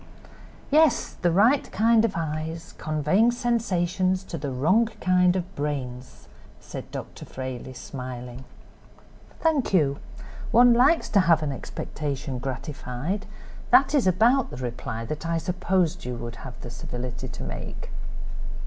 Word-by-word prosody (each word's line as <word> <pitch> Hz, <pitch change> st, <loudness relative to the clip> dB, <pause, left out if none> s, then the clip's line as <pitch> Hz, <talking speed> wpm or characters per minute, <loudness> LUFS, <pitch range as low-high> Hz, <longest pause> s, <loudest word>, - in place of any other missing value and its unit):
"Yes, 310 Hz, -2 st, +4 dB
the 175 Hz, -, 0 dB
right 225 Hz, -, +4 dB
kind 225 Hz, +2 st, +4 dB
of 225 Hz, -4 st, +1 dB
eyes, 160 Hz, +1 st, -4 dB
conveying 155 Hz, +9 st, +2 dB
sensations 190 Hz, -6 st, 0 dB
to 190 Hz, -, -7 dB
the 145 Hz, -3 st, -3 dB
wrong 165 Hz, -, +3 dB
kind 180 Hz, 0 st, +4 dB
of 180 Hz, -1 st, -4 dB
brain," 135 Hz, -4 st, -3 dB, 0.6 s
said -, -, -8 dB
Dr. -, -, -7 dB
Frayley, 130 Hz, 0 st, -6 dB
smiling. 125 Hz, -1 st, -7 dB, 1.0 s
"Thank 300 Hz, -10 st, +2 dB
you; 140 Hz, -5 st, +3 dB, 0.5 s
one 245 Hz, +1 st, +7 dB
likes 265 Hz, +8 st, +4 dB
to 200 Hz, -, +4 dB
have 165 Hz, -4 st, +4 dB
an 145 Hz, -, -1 dB
expectation 135 Hz, 0 st, -4 dB
gratified; 135 Hz, +7 st, -4 dB, 0.4 s
that 275 Hz, +2 st, +5 dB
is 275 Hz, -9 st, +3 dB
about 230 Hz, +8 st, +4 dB
the -, -, -8 dB
reply 115 Hz, -2 st, -4 dB
that 155 Hz, +6 st, -4 dB
I 165 Hz, 0 st, +1 dB
supposed 180 Hz, 0 st, 0 dB
you 125 Hz, 0 st, -4 dB
would 120 Hz, 0 st, -6 dB
have 125 Hz, 0 st, -9 dB
the 120 Hz, -, -7 dB
civility 125 Hz, +1 st, -5 dB
to 125 Hz, -, -7 dB
make." -, -, -6 dB
165 Hz, 135 wpm, -26 LUFS, 130-200 Hz, 1.0 s, one